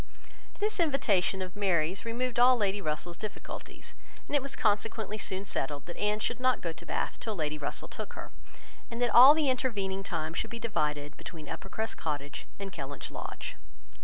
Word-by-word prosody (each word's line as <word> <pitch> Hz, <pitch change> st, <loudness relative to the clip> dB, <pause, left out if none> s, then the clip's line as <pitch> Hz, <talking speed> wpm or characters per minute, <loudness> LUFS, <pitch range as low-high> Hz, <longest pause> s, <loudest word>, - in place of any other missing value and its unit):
This 420 Hz, -1 st, +1 dB
invitation 210 Hz, -, +3 dB
of 185 Hz, 0 st, -8 dB
Mary's 185 Hz, -2 st, +1 dB
removed 240 Hz, +1 st, -1 dB
all 250 Hz, +1 st, +7 dB
Lady 205 Hz, -2 st, +1 dB
Russell's 170 Hz, +1 st, -2 dB
difficulties, 215 Hz, -1 st, -7 dB, 0.3 s
and -, -, -1 dB
it 285 Hz, -, +4 dB
was 275 Hz, 0 st, -3 dB
consequently 215 Hz, 0 st, 0 dB
soon 190 Hz, 0 st, 0 dB
settled 145 Hz, -5 st, -3 dB
that 175 Hz, -, -7 dB
Anne 210 Hz, 0 st, +1 dB
should 240 Hz, +2 st, -1 dB
not 255 Hz, 0 st, +3 dB
go 165 Hz, -2 st, -3 dB
to 165 Hz, +1 st, -12 dB
Bath -, -, -2 dB
till 220 Hz, -3 st, -3 dB
Lady 150 Hz, -3 st, -1 dB
Russell 145 Hz, -, -2 dB
took -, -, -6 dB
her, -, -, -8 dB, 0.6 s
and 230 Hz, -1 st, -5 dB
that 245 Hz, -1 st, +2 dB
all 265 Hz, +5 st, +11 dB
the 310 Hz, -2 st, +2 dB
intervening 210 Hz, -7 st, 0 dB
time 160 Hz, -4 st, -3 dB
should -, -, -2 dB
be 235 Hz, -, -5 dB
divided 150 Hz, -10 st, -1 dB
between 155 Hz, -4 st, -8 dB
Uppercross 220 Hz, +8 st, -3 dB
Cottage 145 Hz, -2 st, -4 dB
and 195 Hz, -1 st, -6 dB
Kellynch 145 Hz, -4 st, -5 dB
Lodge. -, -, -6 dB
200 Hz, 180 wpm, -30 LUFS, 165-240 Hz, 0.6 s, all